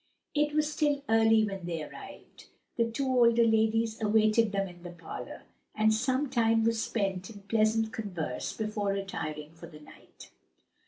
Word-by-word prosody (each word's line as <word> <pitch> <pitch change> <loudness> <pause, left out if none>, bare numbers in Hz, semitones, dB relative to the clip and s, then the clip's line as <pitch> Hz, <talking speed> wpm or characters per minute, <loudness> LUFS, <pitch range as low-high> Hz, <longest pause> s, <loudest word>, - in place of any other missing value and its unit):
It 295 0 +1
was 305 0 +1
still 290 -2 0
early 225 0 +4
when 195 -4 -6
they 165 -3 -3
arrived; - - -12 0.3
the 230 -1 +1
two 250 +4 -2
older 235 -2 +4
ladies 225 0 +1
awaited 215 +1 +3
them 195 -1 -1
in 175 -1 -13
the 175 - -8
parlor, 175 -1 -9 0.3
and 220 0 +3
some 260 +5 0
time 225 -3 +2
was 230 0 +1
spent 195 -5 -2
in 205 -3 -11
pleasant 220 +1 +1
converse 175 - -4
before 210 -2 -2
retiring 155 -6 -5
for 170 +1 -12
the 155 -2 -13
night. 150 - -16
220 Hz, 160 wpm, -29 LUFS, 195-230 Hz, 0.3 s, early